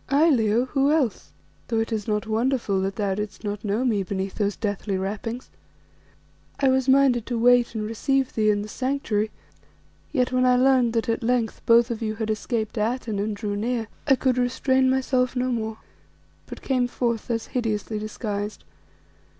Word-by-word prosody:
"Aye, 300 Hz, +4 st, +4 dB
Leo, 230 Hz, -1 st, +2 dB
who 275 Hz, +2 st, +1 dB
else? 285 Hz, -9 st, 0 dB, 0.4 s
though 225 Hz, -2 st, 0 dB
it 225 Hz, +1 st, -2 dB
is 215 Hz, -2 st, -2 dB
not 210 Hz, 0 st, 0 dB
wonderful 225 Hz, -3 st, 0 dB
that 195 Hz, +1 st, -2 dB
thou 200 Hz, -3 st, 0 dB
didst 210 Hz, +1 st, -5 dB
not 205 Hz, -1 st, -4 dB
know 215 Hz, +4 st, 0 dB
me 215 Hz, -5 st, +2 dB
beneath 190 Hz, 0 st, -3 dB
those 205 Hz, -2 st, -1 dB
deathly 205 Hz, -2 st, -2 dB
wrappings. 215 Hz, +6 st, -4 dB, 1.1 s
I 275 Hz, -, +4 dB
was 260 Hz, 0 st, +2 dB
minded 260 Hz, -4 st, +4 dB
to 240 Hz, -, -2 dB
wait 245 Hz, 0 st, +4 dB
and 215 Hz, -1 st, -2 dB
receive 265 Hz, +4 st, 0 dB
thee 215 Hz, -1 st, +2 dB
in 205 Hz, -1 st, +1 dB
the -, -, -7 dB
Sanctuary, 235 Hz, -4 st, -1 dB, 0.8 s
yet 255 Hz, -3 st, +1 dB
when 255 Hz, 0 st, +2 dB
I 250 Hz, 0 st, +5 dB
learned 255 Hz, -2 st, +3 dB
that 230 Hz, +1 st, 0 dB
at 230 Hz, +2 st, 0 dB
length 235 Hz, -1 st, 0 dB
both 235 Hz, +1 st, +5 dB
of 230 Hz, -, -4 dB
you 215 Hz, -1 st, -2 dB
had 220 Hz, 0 st, -2 dB
escaped 220 Hz, 0 st, -2 dB
Atene 225 Hz, -1 st, -1 dB
and 210 Hz, +1 st, -1 dB
drew 205 Hz, -1 st, -3 dB
near, 225 Hz, +1 st, -2 dB, 0.2 s
I 270 Hz, -, +6 dB
could 255 Hz, -1 st, +1 dB
restrain 260 Hz, +1 st, +2 dB
myself 260 Hz, -1 st, +1 dB
no 255 Hz, +1 st, 0 dB
more, 220 Hz, -2 st, -3 dB, 0.7 s
but -, -, -9 dB
came 255 Hz, -2 st, +1 dB
forth 235 Hz, -2 st, -2 dB
thus 230 Hz, -2 st, -2 dB
hideously 220 Hz, -3 st, -1 dB
disguised. 210 Hz, -1 st, -4 dB
230 Hz, 180 wpm, -24 LUFS, 210-255 Hz, 1.1 s, I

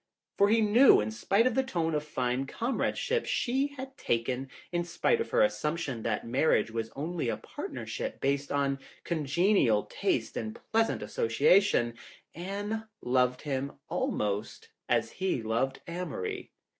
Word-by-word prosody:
For 200 Hz, +1 st, +4 dB
he 225 Hz, +1 st, +4 dB
knew 225 Hz, +5 st, +7 dB
that -, -, +4 dB
in 110 Hz, -, -3 dB
spite 195 Hz, -, +2 dB
of 255 Hz, -, +3 dB
the 265 Hz, -, +3 dB
tone 170 Hz, -11 st, -1 dB
of 150 Hz, -1 st, 0 dB
fine 130 Hz, -2 st, -1 dB
comradeship 270 Hz, -, -1 dB
she 265 Hz, +3 st, +1 dB
had 265 Hz, +1 st, -7 dB
taken, 125 Hz, +3 st, -1 dB, 0.2 s
in 175 Hz, 0 st, 0 dB
spite 315 Hz, -, +1 dB
of -, -, -3 dB
her -, -, +4 dB
assumption 150 Hz, -, -1 dB
that 110 Hz, -2 st, -2 dB
marriage 130 Hz, 0 st, +2 dB
was 115 Hz, 0 st, -3 dB
only 155 Hz, -1 st, -2 dB
a 110 Hz, -, -1 dB
partner -, -, -7 dB
ship -, -, -4 dB
based 140 Hz, +1 st, 0 dB
on 140 Hz, -1 st, +1 dB, 0.2 s
congenial 155 Hz, -, +2 dB
tastes -, -, -1 dB
and 110 Hz, -1 st, -4 dB
pleasant 225 Hz, 0 st, +2 dB
association, 195 Hz, -, +3 dB, 0.4 s
Anne 205 Hz, +5 st, -4 dB, 0.2 s
loved 125 Hz, 0 st, +2 dB
him 140 Hz, -1 st, -2 dB, 0.2 s
almost 105 Hz, 0 st, -2 dB, 0.2 s
as -, -, +2 dB
he 185 Hz, -11 st, -1 dB
loved 120 Hz, +5 st, -1 dB
Amory. 170 Hz, -, -4 dB
150 Hz, 150 wpm, -30 LUFS, 125-210 Hz, 0.4 s, knew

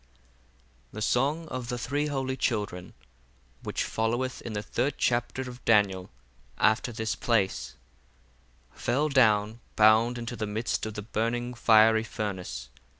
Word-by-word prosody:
The 110 Hz, -, -7 dB
Song 145 Hz, +8 st, +1 dB
of 125 Hz, -2 st, -5 dB
the 125 Hz, -, -2 dB
Three 145 Hz, +5 st, -1 dB
Holy 135 Hz, -2 st, -2 dB
Children 105 Hz, -8 st, -2 dB, 0.7 s
Which -, -, -2 dB
followeth 120 Hz, +3 st, -2 dB
in 115 Hz, -, -6 dB
the 105 Hz, 0 st, -3 dB
third 125 Hz, +6 st, -1 dB
Chapter 120 Hz, +2 st, 0 dB
of 125 Hz, -1 st, -10 dB
DANIEL 100 Hz, -4 st, +2 dB, 0.5 s
after 110 Hz, +3 st, +2 dB
this 110 Hz, -1 st, -2 dB
place,—fell 70 Hz, -, -3 dB
down 110 Hz, -4 st, +3 dB, 0.2 s
bound 110 Hz, +3 st, +5 dB
into 120 Hz, +1 st, -5 dB
the 110 Hz, -2 st, -3 dB
midst 110 Hz, +1 st, -2 dB
of 110 Hz, -, -7 dB
the 105 Hz, -, -5 dB
burning 115 Hz, +3 st, -2 dB
fiery 110 Hz, -1 st, +5 dB
furnace. 95 Hz, -, -5 dB
115 Hz, 130 wpm, -28 LUFS, 105-125 Hz, 0.7 s, bound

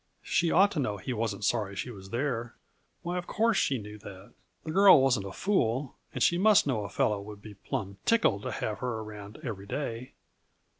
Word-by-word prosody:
She 170 Hz, -, +1 dB
ought 195 Hz, +5 st, +5 dB
to 170 Hz, -, -2 dB
know 105 Hz, -7 st, -1 dB
he 125 Hz, +6 st, -4 dB
wasn't 110 Hz, -3 st, -2 dB
sorry 105 Hz, -4 st, 0 dB
she 120 Hz, -, -4 dB
was 95 Hz, -3 st, -11 dB
there. 120 Hz, -1 st, -2 dB, 0.5 s
Why, 175 Hz, +1 st, -2 dB
of 175 Hz, -, -8 dB
course 225 Hz, -1 st, +2 dB
she 135 Hz, -, +2 dB
knew 105 Hz, -1 st, -9 dB
that! 95 Hz, -1 st, -12 dB, 0.3 s
The 155 Hz, -, -5 dB
girl 195 Hz, -1 st, +8 dB
wasn't 125 Hz, -7 st, +2 dB
a -, -, -7 dB
fool, 130 Hz, -, 0 dB, 0.2 s
and -, -, -1 dB
she 175 Hz, -, +3 dB
must 210 Hz, +1 st, +5 dB
know 125 Hz, -7 st, -1 dB
a 100 Hz, -, -6 dB
fellow 100 Hz, +2 st, 0 dB
would 105 Hz, 0 st, -10 dB
be 105 Hz, -, -9 dB
plumb 100 Hz, 0 st, -5 dB
tickled 215 Hz, -, +2 dB
to -, -, -4 dB
have 105 Hz, -, -3 dB
her 125 Hz, -3 st, -2 dB
around 105 Hz, -1 st, -9 dB
every 100 Hz, -7 st, -6 dB
day. 125 Hz, -1 st, -4 dB
115 Hz, 205 wpm, -29 LUFS, 105-150 Hz, 0.5 s, girl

